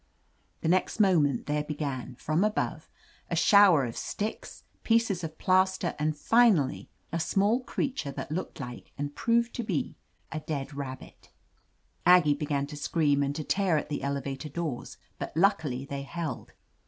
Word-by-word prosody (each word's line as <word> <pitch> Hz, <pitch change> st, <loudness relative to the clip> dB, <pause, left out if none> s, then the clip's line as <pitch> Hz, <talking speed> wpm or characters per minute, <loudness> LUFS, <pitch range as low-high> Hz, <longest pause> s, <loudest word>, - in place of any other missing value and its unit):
The -, -, -2 dB
next 185 Hz, +5 st, +1 dB
moment 165 Hz, -, +3 dB
there 150 Hz, 0 st, 0 dB
began, 140 Hz, -4 st, -4 dB
from 155 Hz, +8 st, 0 dB
above, 215 Hz, 0 st, -1 dB, 0.4 s
a -, -, -1 dB
shower 200 Hz, -, +6 dB
of 115 Hz, -, -6 dB
sticks, 210 Hz, +2 st, -5 dB, 0.2 s
pieces 225 Hz, -6 st, +2 dB
of 160 Hz, -1 st, -6 dB
plaster, 185 Hz, -1 st, +2 dB
and 155 Hz, 0 st, 0 dB
finally, 220 Hz, -, +3 dB, 0.2 s
a 165 Hz, -, -1 dB
small 200 Hz, +8 st, +2 dB
creature 255 Hz, -, -3 dB
that 135 Hz, +1 st, -6 dB
looked 175 Hz, +1 st, -4 dB
like, 125 Hz, -3 st, -8 dB
and 145 Hz, 0 st, -3 dB
I>roved 235 Hz, 0 st, +1 dB
to 240 Hz, -, -3 dB
be, 185 Hz, -9 st, -2 dB, 0.4 s
a 155 Hz, -, -3 dB
dead 145 Hz, -2 st, -4 dB
rabbit 135 Hz, -2 st, -8 dB, 0.7 s
Aggie 175 Hz, -4 st, +6 dB
began 145 Hz, -1 st, -1 dB
to 145 Hz, -, -9 dB
scream 145 Hz, -1 st, +1 dB
and 140 Hz, 0 st, -1 dB
to 155 Hz, -, -3 dB
tear 190 Hz, -1 st, +1 dB
at 150 Hz, -, -3 dB
the 145 Hz, -, -3 dB
elevator 140 Hz, +1 st, -3 dB
doors, 150 Hz, -4 st, -4 dB, 0.2 s
but -, -, -5 dB
luckily 160 Hz, -9 st, +2 dB
they 140 Hz, 0 st, -5 dB
held. 160 Hz, +1 st, -5 dB
155 Hz, 155 wpm, -28 LUFS, 140-190 Hz, 0.7 s, shower